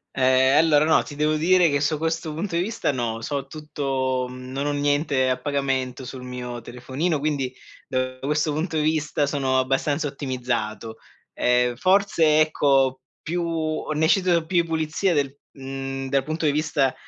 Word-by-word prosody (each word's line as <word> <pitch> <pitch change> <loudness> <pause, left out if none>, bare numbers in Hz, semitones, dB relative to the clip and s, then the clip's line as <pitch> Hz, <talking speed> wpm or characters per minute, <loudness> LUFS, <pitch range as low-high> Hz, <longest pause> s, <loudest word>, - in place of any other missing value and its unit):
Ehm. 130 +1 +4
Allora, 155 -2 +4
no, 160 0 +4
ti 145 - -9
devo 150 +1 +1
dire 175 +2 +4
che, 145 -1 0
su 150 +1 +1
questo 160 0 -2
punto 170 +2 -3
di 170 - +2
vista, 220 -4 -1
no. 115 -3 -3
So 140 +2 -3
tutto 135 -4 -2
non 130 +3 -5
ho - - +1
niente 145 -2 +1
a 130 0 0
pagamento 135 -2 -2
sul 130 +1 -8
mio 125 -1 -6
telefonino, 135 +7 -2
quindi, 140 -3 -1 0.4
da 130 -1 -2
questo 150 +2 0
punto 160 +1 -2
di 150 - +1
vista, 155 -1 +1
sono 135 -2 0
abbastanza 135 +3 0
ottimizzato. 120 -5 -3 0.4
Ehm, 125 0 +2
forse, 185 -4 +3
ecco, 135 -4 +2 0.2
più 165 -2 -2
ne 160 +1 +2
cito 175 -3 +3
più 170 0 +2
pulizie 160 +3 0
del 140 -3 0 0.2
mhmm, 135 0 -5
dal 135 -1 +2
punto 155 +2 -3
di 145 - +4
vista 145 -3 +1
145 Hz, 160 wpm, -24 LUFS, 130-155 Hz, 0.4 s, Ehm